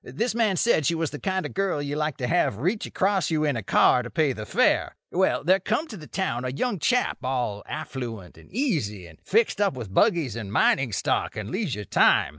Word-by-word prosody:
This 215 - -2
man 220 -5 +1
said 160 - +2
she 170 - +1
was 165 -2 -2
the 145 - -7
kind 190 -1 -1
of - - -6
girl 195 -5 0
you 145 0 -3
like 150 -2 -2
to 125 - -2
have 155 - +1
reach 185 - -1
across 195 -1 0
you 155 -2 +1
in 145 -3 +1
a 115 - -2
car 115 +4 +4
to 125 - -7
pay 155 -3 +1
the 110 -3 -7
fare. - - +2 0.2
Well, - - +1
there 185 +5 +4
come 220 - -1
to 220 - -7
the 155 -3 -11
town 130 -11 -2
a 130 - -2
young 200 - -2
chap 250 - +1
all 125 -6 -2
affluent 120 - -6
and - - -18
easy, 155 - -1
and 85 - -15
fixed 215 -1 +1
up 200 -8 +2
with 110 -7 -7
buggies 165 - +2
and 105 -4 -6
mining 130 +2 +2
stock - - -1
and 105 0 -5
leisure 155 - -3
time. - - +4
150 Hz, 230 wpm, -25 LUFS, 120-195 Hz, 0.2 s, car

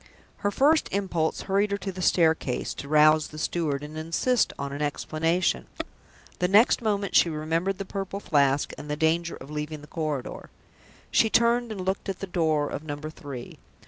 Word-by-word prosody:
Her 205 - 0
first 295 +9 +3
impulse 175 -5 -1
hurried 200 +2 +1
her 200 - -1
to 200 -1 -5
the 185 0 -7
staircase 160 -7 +2
door, - - -7
to 140 - -10
rouse 155 +1 +5
the 155 - -11
steward 155 -3 -1
and 150 +1 -8
insist 165 +10 +1
on 140 0 -4
an 145 - -5
explanation. 165 +4 0 0.7
The 180 - +2
next 210 +7 +5
moment 205 -3 -1
she 170 - +6
remembered 165 +5 -1
the 195 - -5
Purple 195 0 -4
Flask, 140 -6 +1
and 150 - -9
the 150 - -1
danger 165 +2 +1
of 135 +3 -11
leaving 150 0 -4
the - - -11
corridor. 155 -6 -4 0.6
She 220 - +4
turned, 235 +1 +3
and 200 -3 -5
looked 190 +2 -2
at 190 - -3
the 195 - -5
door 160 -5 +1
of 145 - -5
Number 155 0 -6
Three. 140 -6 -9
165 Hz, 185 wpm, -26 LUFS, 150-195 Hz, 0.7 s, she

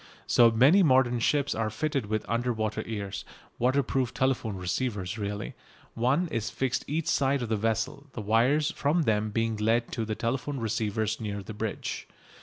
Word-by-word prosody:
So 120 -1 +6
many 135 - +5
modern 130 -6 +4
ships 145 +4 +1
are 115 -1 -1
fitted 140 0 -2
with 110 0 -1
under 120 +2 0
water 110 -1 -2
ears, 100 -3 -4 0.4
waterproof 130 0 +1
telephone 130 -5 0
receivers, 95 +2 -2
really. 105 0 -4 0.4
One 130 +10 +1
is 115 -5 -2
fixed 130 -1 -1
each 155 +2 -1
side 135 -1 +1
of 115 - -4
the 110 - +2
vessel, 115 +7 -1
the 110 - -5
wires 120 +8 +2
from 155 +4 +1
them 110 -3 +1
being 115 +1 -1
led 115 +2 +1
to 115 - -2
telephone 130 +5 -2
receivers 110 -1 -1
near 100 -2 -4
the 110 - -8
bridge. 110 0 -4
115 Hz, 165 wpm, -28 LUFS, 110-135 Hz, 0.4 s, So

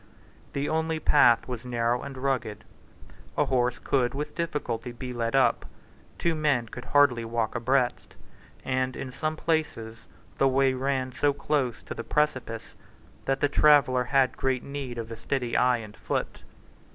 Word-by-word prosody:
The 140 +1 -1
only 160 0 0
path 120 -6 +4
was 125 -2 -5
narrow 120 0 0
and 140 -1 -7
rugged: 130 -5 -2 0.7
a - - +3
horse 125 -2 +1
could 125 -2 0
with 150 +2 -4
difficulty 125 -8 -3
be 125 +1 -7
led 115 0 -1
up: 135 - +3 0.5
two 170 - +1
men 145 -7 +1
could 125 +2 -8
hardly 145 -5 +4
walk 115 -1 -1
abreast; 130 +1 0 0.5
and, 130 0 0
in 130 - -6
some 155 +4 -2
places, 150 -9 -2 0.4
the 135 - +5
way 135 0 +3
ran 130 0 -1
so 140 +2 +1
close 140 -4 -1
by - - -6
the 115 - -6
precipice 130 -7 -1 0.5
that 135 0 0
the 145 - +4
traveller 140 -4 +4
had 135 0 +2
great 130 -2 0
need 140 -3 -6
of 115 0 -5
a - - -4
steady 120 +1 -2
eye 125 -1 +4
and 105 -3 -9
foot. - - -3
130 Hz, 160 wpm, -27 LUFS, 120-140 Hz, 0.7 s, the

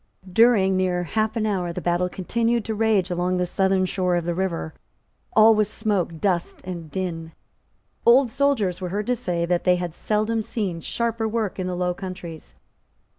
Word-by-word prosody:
During 210 -4 +5
near 180 -1 +1
half 215 +5 -1
an 220 -2 0
hour 185 -5 -1
the - - -4
battle 175 +1 0
continued 230 +5 -1
to 220 - -2
rage 210 -4 +1
along 180 +1 0
the 180 - +1
southern 190 +1 +1
shore 180 -1 0
of 170 -1 -1
the 175 - 0
river. 170 -3 -2 0.6
All 220 +1 +8
was 215 -1 +1
smoke, 200 -7 -1
dust 180 -3 -1
and 170 -3 -6
din. 165 -2 -4 0.7
Old 245 +1 +5
soldiers 225 -10 +1
were 180 - -3
heard 205 +3 -2
to 250 - +1
say 175 -8 -2
that 175 0 0
they 180 -1 +4
had 175 -2 -4
seldom 215 +4 0
seen 205 -6 -3
sharper 230 +3 -1
work 220 -3 -2
in 185 - -2
the 180 - -2
Low 180 0 0
Countries. 180 -3 -8
185 Hz, 180 wpm, -23 LUFS, 175-220 Hz, 0.7 s, All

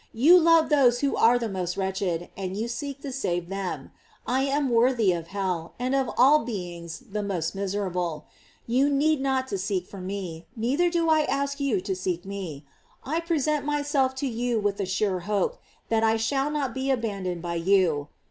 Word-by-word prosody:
You 310 +11 +7
love 330 -1 +5
those 255 -5 +4
who 280 -1 +1
are 235 +2 +5
the 235 -1 -2
most 185 -2 -3
wretched, 190 -3 -2
and 190 0 -4
you 225 +2 -2
seek 275 +3 -5
to 280 - -4
save 175 -10 -2
them. 195 -1 -4 0.3
I 260 +2 +1
am 280 -1 0
worthy 235 -3 +3
of 170 -2 -3
hell, 185 -4 -3
and 255 +2 -1
of 270 -2 +1
all 285 +5 +6
beings 175 -3 -6
the 210 +1 -2
most 180 -5 -2
miserable; 185 -5 -2 0.4
you 260 +5 +2
need 290 +1 +2
not 265 -1 0
to 195 - -2
seek 185 -1 -3
me, 185 -3 -6
neither 270 +10 +1
do 340 -1 0
I 315 -1 +5
ask 280 0 -1
you 260 -9 +1
to 190 0 -2
seek 180 -1 -3
me; 185 -8 -6 0.4
I 315 +5 -1
present 305 -3 0
my 295 0 -1
self 270 -3 +1
to 270 +1 -2
you 240 -1 -1
with 205 -1 -1
a 195 - -1
sure 190 0 0
hope 210 - -1 0.3
that 225 0 +2
I 225 0 +3
shall 270 +5 0
not 285 -5 -2
be 265 +2 -2
abandoned 200 -9 -2
by 170 -1 -3
you. 165 -5 +2
225 Hz, 190 wpm, -26 LUFS, 185-275 Hz, 0.4 s, You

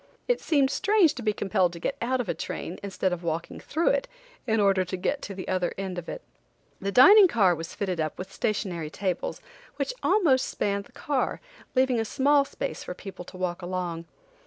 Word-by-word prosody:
It - - +1
seemed 280 -4 +2
strange 405 -7 +3
to 265 - -7
be 215 -2 +1
compelled 185 -3 +1
to 170 - -8
get 270 - -2
out 255 +2 0
of 245 - -2
a - - 0
train, 165 +2 -5
instead 190 -2 -1
of 175 - -4
walking 165 0 -3
through 330 +7 0
it, - - +1 0.4
in 220 -1 +2
order 195 -2 +4
to 185 +1 -4
get 280 +10 -1
to 200 - -6
the 185 - -7
other 180 -1 -1
end 190 -2 -3
of 170 - -9
it. - - -6 0.6
The 200 +1 -2
dining 400 - +9
car 200 - +3
was 165 0 -6
fitted 185 -4 -2
up 155 -1 -2
with 190 +1 -7
stationary 180 -7 -2
tables 185 +1 -3 0.3
which - - -2
almost 295 -11 +3
spanned 200 0 -1
the - - -20
car, 275 +1 -1 0.4
leaving 255 -2 +3
a - - +1
small 280 +4 +3
space - - -5
for 180 - -6
people 190 -2 -9
to 185 - -11
walk 180 -1 -2
along. 175 -2 -3
200 Hz, 205 wpm, -27 LUFS, 180-265 Hz, 0.6 s, dining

